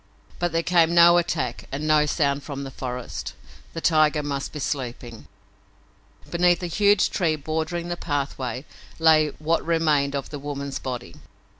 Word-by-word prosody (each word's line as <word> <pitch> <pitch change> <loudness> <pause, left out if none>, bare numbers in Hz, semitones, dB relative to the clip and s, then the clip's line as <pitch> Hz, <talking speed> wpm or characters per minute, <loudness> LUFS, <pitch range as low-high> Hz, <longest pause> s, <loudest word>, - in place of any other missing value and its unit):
But 175 0 0
there 165 +1 0
came 170 -1 +3
no 170 0 +7
attack 165 -8 -2
and 145 +3 -3
no 150 -1 +4
sound 145 -2 0
from 140 -1 -6
the 135 - -7
forest. 125 -1 -6 0.4
The 165 - -5
tiger 155 -2 +3
must 140 -1 -3
be - - -7
sleeping. 125 -5 -5 1.0
Beneath 175 +1 +2
a - - 0
huge 205 +3 +3
tree 165 -4 +1
bordering 160 +3 -3
the 175 - -3
pathway 135 -4 -3 0.3
lay 160 -1 +5
what 160 +2 0
remained 155 -4 +1
of 140 - -4
the 145 - -5
woman's 140 -1 -5
body. 125 -2 -6
155 Hz, 155 wpm, -24 LUFS, 140-170 Hz, 1.0 s, no